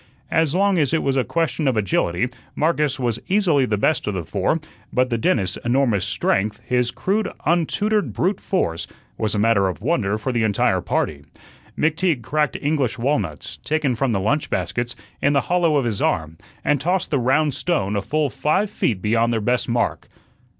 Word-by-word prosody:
As 160 -1 +2
long 195 -1 +3
as 150 +1 +2
it 160 - 0
was 135 -1 +1
a 130 - +2
question 160 -2 -1
of 130 -4 +2
agility, 95 0 +1 0.3
Marcus 150 -3 +1
was 120 -2 -1
easily 175 -10 +3
the 105 - 0
best 135 +5 +1
of 105 - -1
the 90 -3 -3
four; 100 - 0 0.3
but 125 0 +1
the 115 - +1
dentist's 100 -5 +1
enormous 120 -6 +2
strength, 105 +1 0
his 125 -1 +1
crude, 205 - -1
untutored 200 +6 +1
brute 185 +3 0
force, 85 - -1 0.3
was 110 -1 0
a - - 0
matter 105 -2 +3
of 90 - -4
wonder 110 - 0
for 120 +5 -3
the 120 -2 0
entire 110 -2 +2
party. 70 -2 -1 0.5
McTeague 160 -4 +1
cracked 150 +4 0
English 145 -5 0
walnuts 115 - -2
taken 150 -4 0
from 125 +2 0
the 100 - +1
lunch 140 +10 0
baskets 120 0 -2 0.3
in 145 - +3
the 140 - +3
hollow 175 -3 +2
of 135 - +1
his 110 -4 -2
arm, 80 0 -1 0.3
and 145 -3 +2
tossed 180 +4 0
the 140 - +2
round 135 +4 +2
stone 105 - -1
a 100 - 0
full 150 +6 0
five 150 +10 0
feet 95 -6 -1
beyond 115 +2 +2
their 115 - +1
best 125 +3 0
mark. 120 0 -1
130 Hz, 185 wpm, -22 LUFS, 110-155 Hz, 0.5 s, long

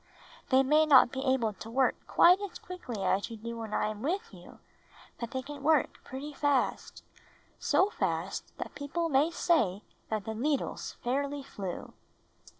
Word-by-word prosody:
They 265 0 +5
may 305 +3 +4
not 260 -5 +7
be 265 0 -3
able 230 -5 +1
to 220 +3 -10
work 255 +2 +3
quite 360 +2 +6
as 405 -2 -5
quickly 250 - -6
as 190 +3 +1
you 230 - -7
do 230 +2 -6
when 220 -2 -6
I - - +1
am 215 -1 -6
with 390 - -2
you, - - -13 0.6
but 235 - -4
they 260 +2 -4
can 285 +1 -8
work 305 0 +2
pretty 280 +3 -7
fast 285 -2 0 0.3
— - - -32
so 400 +2 +3
fast - - -2
that - - -6
people 330 +4 -2
may 285 +2 +3
say 310 - +1 0.3
that 215 -2 -2
the 220 - -3
needles 280 +6 -2
fairly 280 +3 -1
flew." 195 -8 -6
265 Hz, 170 wpm, -30 LUFS, 225-300 Hz, 0.6 s, not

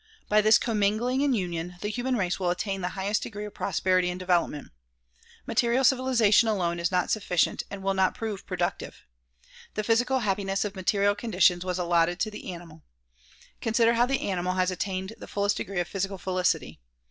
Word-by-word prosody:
By 215 0 +4
this 215 +1 +6
commingling 225 +4 0
and 280 -4 +2
union, 175 -2 -4
the 210 - -2
human 245 +4 -1
race 190 -5 -1
will 180 -2 0
attain 195 +2 -2
the 180 - -1
highest 200 +2 0
degree 210 -1 -6
of 210 - -9
prosperity 185 -1 +1
and 180 0 -4
development. 175 -5 0 0.7
Material 240 +2 +1
civilization 250 -4 +4
alone 175 -5 0
is 170 0 0
not 180 -1 +1
sufficient 180 -6 +1
and 200 -1 -7
will 195 0 +1
not 190 -1 +1
prove 215 -3 -5
productive. 180 -2 -3 0.7
The 215 - -1
physical 245 +4 +2
hap 195 -4 +1
piness 195 +1 -1
of 205 - -5
material 200 +2 +2
conditions 185 -5 +2
was 180 -1 -2
allotted 175 0 +1
to 215 - 0
the 210 -2 -7
animal. 170 -2 -11 0.8
Consider 230 +1 +3
how 240 +1 +3
the 270 +1 0
animal 180 -1 -1
has 185 0 +1
attained 190 +2 -3
the - - -9
fullest 205 0 0
degree 195 -2 -3
of 175 - -1
physical 195 +1 -3
felicity. 185 0 -1
195 Hz, 180 wpm, -27 LUFS, 180-215 Hz, 0.8 s, this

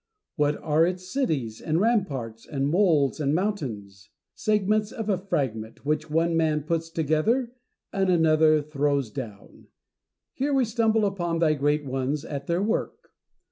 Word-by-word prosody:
What 150 -1 +1
are 155 +1 +3
its 180 +1 -1
cities 140 - -1
and 160 +1 0
ramparts, 140 - -1
and 140 -1 -1
moles 160 -5 +2
and 145 0 +1
monu 195 -5 0
ments? 100 +1 -19 0.2
Segments 210 0 +1
of 220 -2 -5
a 195 - +2
fragment, 130 - -3
which 155 +1 -1
one 165 +2 +1
man 155 -2 +1
puts 165 +1 -2
together 165 - 0 0.4
and 190 -1 +1
another 155 -3 +4
throws 140 -4 -1
down. 110 -7 -9 0.7
Here 280 +1 0
we 265 -2 +3
stumble 225 -1 +2
upon 175 -4 -1
thy 165 -2 +3
great 145 +1 0
ones 135 +3 -2
at 140 -1 -6
their 170 +3 +1
work. 220 +2 -3
155 Hz, 150 wpm, -26 LUFS, 140-195 Hz, 0.7 s, another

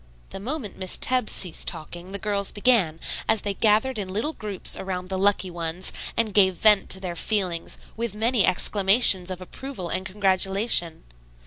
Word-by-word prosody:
The - - -8
moment 235 -1 -6
Miss 185 -1 0
Tebbs 255 -3 +2
ceased 180 -4 -2
talking 175 +2 -5
the 200 - -4
girls 200 -1 -3
began, 205 -8 +1 0.3
as 220 -1 +3
they 205 - -3
gathered 220 +4 +1
in 190 -2 -5
little 225 +11 -2
groups 205 - -1
around 185 -1 -6
the 190 - -3
lucky 195 -2 +1
ones 170 +1 -2 0.2
and 220 -3 0
gave 190 -3 +4
vent 210 +1 +3
to 190 - -3
their 180 -2 -6
feelings 180 -3 -2 0.2
with 230 -2 -4
many 225 0 +1
exclamations 190 0 +5
of 185 -1 -6
approval 190 -1 -8
and 185 - 0
congratulation. 190 -2 +1
195 Hz, 165 wpm, -23 LUFS, 185-215 Hz, 0.3 s, exclamations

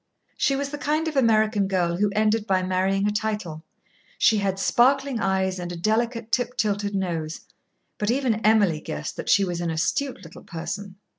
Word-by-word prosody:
She 275 - +1
was 280 0 -2
the 290 0 -6
kind 305 +2 0
of 310 - -3
American 215 -5 +3
girl 175 -3 0
who 205 +2 +2
ended 215 0 +1
by 185 -2 +2
marrying 190 +2 +1
a - - +1
title. 210 -7 -3 0.5
She 220 -2 +4
had 195 -1 -1
sparkling 265 +5 +2
eyes 190 -2 0
and 175 0 -5
a - - -5
delicate 230 +4 -1
tip 245 0 0
tilted 205 -1 0
nose. 165 -4 -3 0.6
But 210 - 0
even 240 -3 0
Emily 205 -7 +4
guessed - - -5
that - - -5
she 200 - +5
was 175 -1 -3
an 170 - -1
astute 260 - -1
little 165 - -12
person. 190 +4 -6
205 Hz, 180 wpm, -24 LUFS, 185-230 Hz, 0.6 s, she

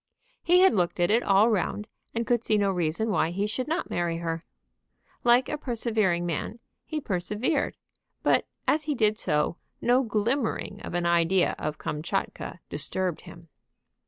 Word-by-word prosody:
He 360 +1 +5
had 380 - +6
looked 180 -3 0
at 175 +3 +3
it 230 +2 +4
all 205 +3 +4
round, 210 +1 -1 0.3
and 230 0 0
could 240 -1 +1
see 215 - +2
no 200 -1 +2
reason 180 +5 0
why 165 - +2
he 195 +4 -1
should 250 +5 -2
not 325 +3 -2
marry 170 -1 -1
her. 165 0 -3 0.8
Like 245 +1 +5
a 300 - -3
persevering 220 -9 0
man, 170 +6 -3 0.3
he 310 - -3
persevered; 215 - -1 0.5
but - - +3 0.2
as 300 0 +2
he 300 -2 -1
did 215 -2 +2
so, 150 -1 0 0.2
no 245 +2 +3
glimmering 225 -2 -1
of - - -6
an 175 0 0
idea 170 +2 +3
of 150 0 -3
Kamtchatka 170 +2 -4
disturbed 180 +3 -1
him. 170 - -12
205 Hz, 160 wpm, -27 LUFS, 175-240 Hz, 0.8 s, had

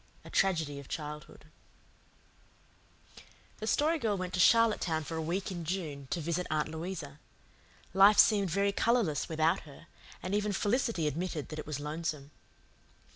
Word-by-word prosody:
A - - -11
TRAGEDY 160 -7 +1
OF 140 - -11
CHILDHOOD 150 -2 -7 2.1
The 215 - -5
Story 310 +7 +2
Girl 215 -6 0
went 185 -1 -4
to 185 - -1
Charlottetown 210 -7 +4
for 165 - -6
a 160 - -2
week 180 +5 -2
in 175 -2 -5
June 155 -5 -4
to 175 - -1
visit 170 +3 -2
Aunt 155 0 0
Louisa. 160 -3 -6 0.7
Life 200 +2 +7
seemed 200 -4 +5
very 200 +4 +1
colourless 220 -8 +1
without 160 +3 +2
her, 150 +1 -14 0.4
and 185 +2 -3
even 210 0 0
Felicity 210 -4 0
admitted 155 0 -3
that 155 - -6
it 150 - -7
was 150 -2 -3
lonesome. 150 -1 -4
170 Hz, 150 wpm, -31 LUFS, 155-200 Hz, 2.1 s, Life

